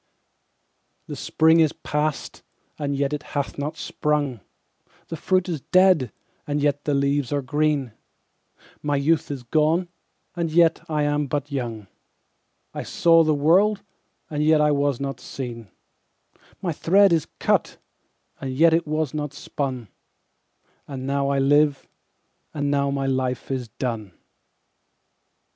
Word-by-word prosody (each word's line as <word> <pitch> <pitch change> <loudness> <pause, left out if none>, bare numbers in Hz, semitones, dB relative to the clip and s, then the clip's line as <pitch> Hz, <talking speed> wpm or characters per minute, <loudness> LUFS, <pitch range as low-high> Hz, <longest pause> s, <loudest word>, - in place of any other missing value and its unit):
7The - - -6
spring 160 +1 +3
is 155 -3 +3
past, 150 0 -3 0.4
and 140 -1 -2
yet 140 +1 -1
it 150 - -2 0.2
hath 140 0 -3
not 150 +3 -4
sprung,8The 150 - -5
fruit 185 -1 +1
is 165 -6 -3
dead, 180 - +4 0.4
and 145 0 -1
yet 145 0 0
the 145 - +1
leaves 140 -1 0
are 145 -1 -1
green,9My 145 +1 -4
youth 155 +3 +1
is 140 -3 -5
gone, 160 +7 +1 0.5
and 170 -2 -2
yet 165 0 +4
I 150 -1 0
am 145 0 0
but 145 +1 -3
young,10I 115 -7 -9
saw 165 -1 +4
the 155 -1 +2
world, 195 +8 +3 0.4
and 150 -1 -2
yet 155 0 +4
I 150 0 +3
was 140 -3 +1
not 135 -2 -4
seen,11My 125 - -9
thread 195 +3 +4
is 160 -3 +1
cut, - - 0 0.6
and 135 - -4
yet 160 +5 +4
it 165 -1 +1
was 155 -2 -1
not 150 -2 -4
spun,12And 130 +1 -9
now 140 +1 -1
I 140 - +1
live, 145 +1 +3 0.7
and 145 -1 -1
now 140 -1 +1
my 140 -1 -1
life 130 -1 -2
is 130 -3 -3
done. 110 -6 -5
145 Hz, 130 wpm, -23 LUFS, 135-155 Hz, 0.7 s, dead